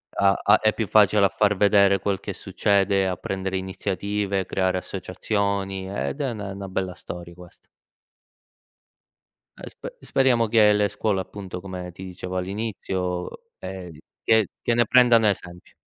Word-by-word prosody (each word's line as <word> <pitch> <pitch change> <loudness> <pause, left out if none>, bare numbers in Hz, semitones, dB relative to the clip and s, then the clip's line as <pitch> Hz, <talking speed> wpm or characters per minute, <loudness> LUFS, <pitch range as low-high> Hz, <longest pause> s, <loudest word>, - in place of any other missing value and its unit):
a 100 0 +4
a 105 +1 +5
è 110 0 +2
più 110 -3 -2
facile 105 -1 +4
a - - +3
far 105 +1 +2
vedere 100 0 +4
quel 100 -2 -1
che - - -6
succede, 100 -1 +1
a 90 - -1
prendere 95 0 -3
iniziative, 95 +1 -2
creare 95 -1 0
associazioni 95 +1 -3
ed 100 +8 -4
è 135 -4 -1
ne 100 -3 -6
'na 100 0 -6
bella 95 -1 -3
storia 85 0 -9
questa. 90 -1 -16 1.9
Eh, - - -9
spe - - -10
speriamo 125 -4 +2
che 105 -1 +5
le 105 0 +2
scuole 100 -1 -1
appunto, 95 -2 -8
come 90 -2 -7
ti 95 +2 -11
dicevo 90 0 -6
all'inizio, 95 -2 -4
ehm, 95 -2 -7
d 75 - -14 0.2
che 110 -2 +4
che 120 - +1
ne 120 0 +3
prendano 120 -3 +5
esempio. 90 -3 -4
95 Hz, 155 wpm, -24 LUFS, 95-105 Hz, 1.9 s, a